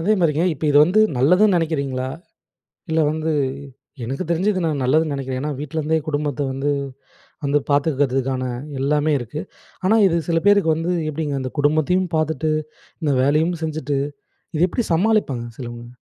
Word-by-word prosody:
அதேமாரிங்க 170 Hz, -4 st, +2 dB
இப்ப 155 Hz, -, -6 dB
இது 145 Hz, -, +3 dB
வந்து 185 Hz, +6 st, +3 dB, 0.2 s
நல்லதுன்னு 180 Hz, +8 st, +4 dB
நினைக்கிறீங்களா? 140 Hz, -5 st, -2 dB, 0.8 s
இல்ல 160 Hz, -, +2 dB
வந்து, 160 Hz, +1 st, -2 dB, 0.7 s
எனக்கு 135 Hz, +9 st, -3 dB
தெரிஞ்சு, 185 Hz, +5 st, +2 dB
இது 185 Hz, -, -2 dB
நான் 150 Hz, -4 st, -1 dB
நல்லதுன்னு 155 Hz, +4 st, +2 dB
நினைக்கிறேன். 130 Hz, -1 st, -4 dB
ஏன்னா 150 Hz, +1 st, -2 dB
வீட்லேருந்தே 155 Hz, +2 st, -1 dB
குடும்பத்த 145 Hz, -1 st, -2 dB
வந்து 135 Hz, +2 st, -1 dB, 0.7 s
வந்து 145 Hz, +1 st, +2 dB
பார்த்துக்கிறதுக்கான 135 Hz, -3 st, +1 dB, 0.4 s
எல்லாமே 150 Hz, +2 st, +2 dB
இருக்கு. 120 Hz, +6 st, -5 dB, 0.4 s
ஆனா 215 Hz, +4 st, +4 dB
இது 170 Hz, -2 st, +1 dB
சில 165 Hz, 0 st, +3 dB
பேருக்கு 200 Hz, -6 st, +4 dB
வந்து 165 Hz, +3 st, -2 dB, 0.2 s
எப்படிங்க, 150 Hz, -1 st, -3 dB
இந்த 130 Hz, -, -4 dB
குடும்பத்தையும் 155 Hz, +5 st, +2 dB
பார்த்துட்டு, 155 Hz, 0 st, 0 dB, 0.5 s
இந்த 145 Hz, -2 st, +2 dB
வேலையும் 155 Hz, +5 st, +2 dB
செஞ்சுட்டு, 150 Hz, -3 st, -2 dB, 0.6 s
இது 170 Hz, +4 st, +4 dB
எப்படி 240 Hz, -, -1 dB
சமாளிப்பாங்க 170 Hz, -, +1 dB
சிலவங்க? 120 Hz, -2 st, -7 dB
155 Hz, 140 wpm, -21 LUFS, 140-165 Hz, 0.8 s, நல்லதுன்னு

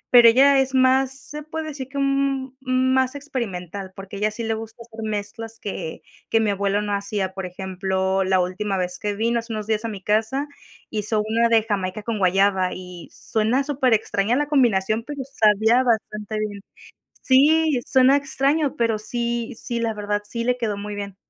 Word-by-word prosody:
pero 235 Hz, -1 st, +10 dB
ella 270 Hz, +3 st, +5 dB
es 265 Hz, 0 st, 0 dB
más 260 Hz, 0 st, +4 dB, 0.2 s
se 300 Hz, -, -6 dB
puede 315 Hz, +1 st, -5 dB
decir 275 Hz, -3 st, -6 dB
que 280 Hz, -, -7 dB
un 275 Hz, -1 st, 0 dB
un 255 Hz, 0 st, +1 dB
más 260 Hz, +1 st, +1 dB
experimental, 200 Hz, -, -5 dB
porque 195 Hz, +1 st, -9 dB
a -, -, -6 dB
ella 210 Hz, +1 st, +2 dB
sí 220 Hz, +2 st, -6 dB
le 225 Hz, 0 st, -1 dB
gusta 225 Hz, +1 st, -8 dB
hacer 225 Hz, -1 st, -7 dB
mezclas 215 Hz, +2 st, -5 dB
que 180 Hz, -5 st, -6 dB, 0.3 s
que 225 Hz, -, +3 dB
mi 215 Hz, -2 st, +1 dB
abuelo 200 Hz, +1 st, 0 dB
no 205 Hz, -1 st, -2 dB
hacía, 200 Hz, -1 st, -2 dB
por 190 Hz, -1 st, -5 dB
ejemplo, 190 Hz, +1 st, -1 dB
la 185 Hz, 0 st, +2 dB
última 190 Hz, +2 st, -1 dB
vez 180 Hz, -1 st, -2 dB
que 205 Hz, -1 st, -2 dB
vino 230 Hz, +2 st, +1 dB
hace 230 Hz, +1 st, -8 dB
unos 215 Hz, -1 st, -4 dB
días 220 Hz, 0 st, -1 dB
a -, -, 0 dB
mi 200 Hz, -4 st, -7 dB
casa 225 Hz, +7 st, +1 dB, 0.4 s
hizo 215 Hz, 0 st, +2 dB
una 230 Hz, +1 st, +2 dB
de 225 Hz, -1 st, +4 dB
jamaica 205 Hz, -2 st, -3 dB
con 225 Hz, -1 st, -3 dB
guayaba 190 Hz, 0 st, +2 dB
y 180 Hz, -2 st, -10 dB
suena 225 Hz, +5 st, 0 dB
súper 265 Hz, -4 st, +2 dB
extraña 210 Hz, +1 st, 0 dB
la 290 Hz, +2 st, +1 dB
combinación, 225 Hz, -6 st, +2 dB
pero 280 Hz, +1 st, -6 dB
sabía 220 Hz, -2 st, +3 dB
bastante 215 Hz, -3 st, -1 dB
bien. 205 Hz, -2 st, -4 dB, 0.6 s
Sí, 295 Hz, +2 st, +4 dB
suena 265 Hz, +1 st, +5 dB
extraño, 280 Hz, +1 st, +1 dB
pero 230 Hz, -2 st, +1 dB
sí 235 Hz, +1 st, -3 dB
sí, 235 Hz, -2 st, 0 dB
la 230 Hz, -2 st, -1 dB
verdad, 205 Hz, 0 st, -2 dB
sí, 230 Hz, +2 st, -4 dB
le 250 Hz, +1 st, +1 dB
quedó 215 Hz, -4 st, -2 dB
muy 205 Hz, +1 st, -6 dB
bien. 200 Hz, -1 st, -6 dB
225 Hz, 190 wpm, -22 LUFS, 200-260 Hz, 0.6 s, pero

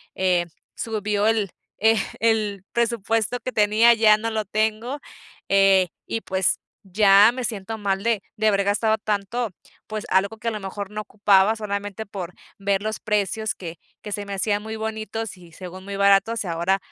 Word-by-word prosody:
eh, 180 Hz, -2 st, +2 dB, 0.3 s
subió 210 Hz, -2 st, -1 dB
el 215 Hz, -4 st, +1 dB, 0.7 s
el 215 Hz, -4 st, +1 dB
presupuesto 230 Hz, 0 st, 0 dB
que 255 Hz, -, -4 dB
tenía 215 Hz, +2 st, +5 dB
ya 215 Hz, -1 st, +6 dB
no 225 Hz, +1 st, -3 dB
lo 215 Hz, -1 st, -2 dB
tengo. 220 Hz, +6 st, -1 dB, 0.5 s
Eh, 195 Hz, -1 st, +5 dB, 0.2 s
y 225 Hz, -, -2 dB
pues, 190 Hz, -1 st, 0 dB, 0.2 s
ya 200 Hz, +2 st, +6 dB
me 255 Hz, -, -4 dB
siento 220 Hz, -1 st, -4 dB
mal 195 Hz, -1 st, -1 dB
de 230 Hz, -3 st, +1 dB, 0.2 s
de 215 Hz, 0 st, +2 dB
haber 200 Hz, -1 st, +3 dB
gastado 220 Hz, +2 st, +2 dB
tanto, 215 Hz, +3 st, -2 dB, 0.4 s
pues, 215 Hz, -1 st, -5 dB
algo 200 Hz, +4 st, +1 dB
que 230 Hz, +1 st, -7 dB
a -, -, -4 dB
lo 215 Hz, -, -4 dB
mejor 195 Hz, +1 st, -6 dB
no 215 Hz, -, -4 dB
ocupaba 205 Hz, 0 st, +3 dB
solamente 205 Hz, 0 st, -4 dB
por 180 Hz, -3 st, -6 dB, 0.3 s
ver 200 Hz, 0 st, 0 dB
los 215 Hz, 0 st, -3 dB
precios 210 Hz, 0 st, -1 dB
que 170 Hz, -2 st, -8 dB, 0.3 s
que 210 Hz, -, -7 dB
se 205 Hz, -1 st, -3 dB
me 200 Hz, -, -5 dB
hacían 205 Hz, +1 st, 0 dB
muy 220 Hz, 0 st, -5 dB
bonitos, 220 Hz, -1 st, -4 dB
y 175 Hz, -2 st, -16 dB
según 185 Hz, +2 st, -9 dB
muy 200 Hz, -, -5 dB
baratos. 200 Hz, +3 st, +3 dB
Y 190 Hz, -, -7 dB
ahora 170 Hz, +3 st, +1 dB
210 Hz, 175 wpm, -23 LUFS, 195-220 Hz, 0.7 s, ya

